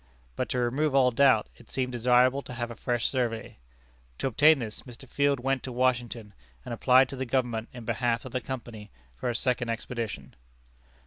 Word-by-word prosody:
But -, -, -2 dB
to -, -, -1 dB
remove 135 Hz, +4 st, 0 dB
all 130 Hz, -2 st, +5 dB
doubt 130 Hz, -3 st, +4 dB
it 120 Hz, -, -18 dB
seemed 130 Hz, -1 st, -2 dB
desirable 125 Hz, +2 st, +3 dB
to 125 Hz, -, -9 dB
have 120 Hz, 0 st, -4 dB
a -, -, -7 dB
fresh 120 Hz, -1 st, -1 dB
survey. 115 Hz, -, -2 dB, 0.6 s
To -, -, -3 dB
obtain 145 Hz, +5 st, +5 dB
this, 110 Hz, -5 st, -6 dB
Mr. 125 Hz, +1 st, -12 dB
Field 140 Hz, +1 st, +1 dB
went 135 Hz, +1 st, 0 dB
to 130 Hz, -, -6 dB
Washington 120 Hz, -3 st, -1 dB, 0.3 s
and -, -, -5 dB
applied 130 Hz, +1 st, +5 dB
to 135 Hz, -, -6 dB
the 130 Hz, -, -3 dB
Government 120 Hz, -3 st, -1 dB
in 120 Hz, -3 st, -10 dB
behalf 115 Hz, +1 st, -1 dB
of 130 Hz, -, -8 dB
the 130 Hz, +1 st, -2 dB
Company 115 Hz, -5 st, -7 dB, 0.3 s
for 65 Hz, -, -3 dB
a 120 Hz, -, -2 dB
second 125 Hz, 0 st, 0 dB
expedition. 115 Hz, -, -5 dB
125 Hz, 190 wpm, -28 LUFS, 115-130 Hz, 0.6 s, all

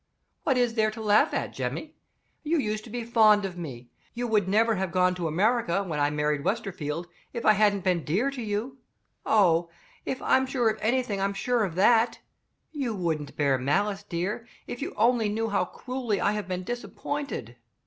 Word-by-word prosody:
What 275 Hz, -8 st, +1 dB
is 245 Hz, -2 st, +2 dB
there 220 Hz, -1 st, +2 dB
to 215 Hz, +1 st, -8 dB
laugh 210 Hz, -1 st, +4 dB
at, -, -, -2 dB
Jemmy? -, -, -4 dB, 0.5 s
You 320 Hz, +2 st, 0 dB
used 215 Hz, -5 st, -1 dB
to -, -, -11 dB
be 240 Hz, +1 st, -4 dB
fond 215 Hz, -3 st, +5 dB
of 185 Hz, -2 st, -5 dB
me; 125 Hz, -8 st, -8 dB, 0.2 s
you 245 Hz, +1 st, -2 dB
would 210 Hz, -4 st, +2 dB
never 225 Hz, +4 st, +3 dB
have 190 Hz, -3 st, -2 dB
gone 180 Hz, +1 st, +3 dB
to 175 Hz, -2 st, -3 dB
America, 200 Hz, +2 st, +1 dB
when 160 Hz, -6 st, -3 dB
I 145 Hz, 0 st, +3 dB
married 150 Hz, -1 st, 0 dB
Westerfield, 170 Hz, -5 st, -2 dB, 0.3 s
if 235 Hz, -1 st, -4 dB
I 215 Hz, -, +7 dB
hadn't 205 Hz, -2 st, +2 dB
been 180 Hz, -3 st, +1 dB
dear 215 Hz, -, 0 dB
to 265 Hz, -3 st, -6 dB
you. 225 Hz, +5 st, -3 dB, 0.5 s
Oh, 170 Hz, -5 st, +4 dB, 0.3 s
if 260 Hz, -, -3 dB
I'm 260 Hz, 0 st, +3 dB
sure 245 Hz, -4 st, +2 dB
of 215 Hz, -, -7 dB
anything, 220 Hz, -3 st, 0 dB
I'm 200 Hz, 0 st, 0 dB
sure 240 Hz, +3 st, +1 dB
of 180 Hz, -5 st, -3 dB
that! 230 Hz, +4 st, +4 dB, 0.5 s
You 265 Hz, -8 st, -2 dB
wouldn't 160 Hz, -6 st, -3 dB
bear 140 Hz, -3 st, +2 dB
malice, 195 Hz, +9 st, 0 dB
dear, 195 Hz, +7 st, -3 dB, 0.2 s
if 245 Hz, -, -7 dB
you 315 Hz, -, -4 dB
only 230 Hz, -1 st, +3 dB
knew 225 Hz, +2 st, -1 dB
how 205 Hz, -, +2 dB
cruelly 250 Hz, -5 st, -3 dB
I 205 Hz, -, +2 dB
have 210 Hz, -2 st, -3 dB
been 185 Hz, 0 st, -3 dB
disappointed." 240 Hz, -, -5 dB
210 Hz, 190 wpm, -27 LUFS, 180-235 Hz, 0.5 s, I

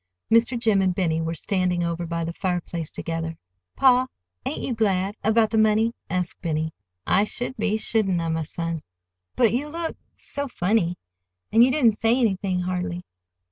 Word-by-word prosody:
Mr. 230 Hz, +2 st, +4 dB
Jim 220 Hz, -4 st, +3 dB
and 185 Hz, -2 st, +1 dB
Benny 165 Hz, -4 st, +1 dB
were 165 Hz, +1 st, -2 dB
standing 180 Hz, 0 st, 0 dB
over 170 Hz, 0 st, -2 dB
by 170 Hz, 0 st, -2 dB
the 165 Hz, +1 st, -3 dB
fireplace 175 Hz, -3 st, -3 dB
together. 165 Hz, 0 st, -4 dB, 0.4 s
"Pa, 255 Hz, -1 st, +5 dB, 0.4 s
ain't -, -, -3 dB
you 255 Hz, -, -1 dB
glad—about 215 Hz, +1 st, +1 dB
the 220 Hz, -, +3 dB
money?" 220 Hz, +1 st, +3 dB, 0.2 s
asked 180 Hz, 0 st, -2 dB
Benny. 160 Hz, -2 st, -1 dB, 0.3 s
"I 195 Hz, -, +4 dB
should 245 Hz, +4 st, -3 dB
be, 215 Hz, -2 st, 0 dB
shouldn't 215 Hz, -5 st, +1 dB
I, 165 Hz, -, -2 dB
my 160 Hz, 0 st, 0 dB
son?" 165 Hz, 0 st, -4 dB, 0.5 s
"But 230 Hz, -4 st, +4 dB
you 270 Hz, +5 st, 0 dB
look—so 310 Hz, -3 st, -6 dB
funny, 180 Hz, -5 st, +1 dB, 0.5 s
and 225 Hz, +2 st, +7 dB
you 250 Hz, -, +5 dB
didn't 245 Hz, -6 st, +3 dB
say 230 Hz, +3 st, +3 dB
anything, 190 Hz, -5 st, +1 dB
hardly." 180 Hz, -1 st, -3 dB
195 Hz, 160 wpm, -24 LUFS, 170-225 Hz, 0.5 s, and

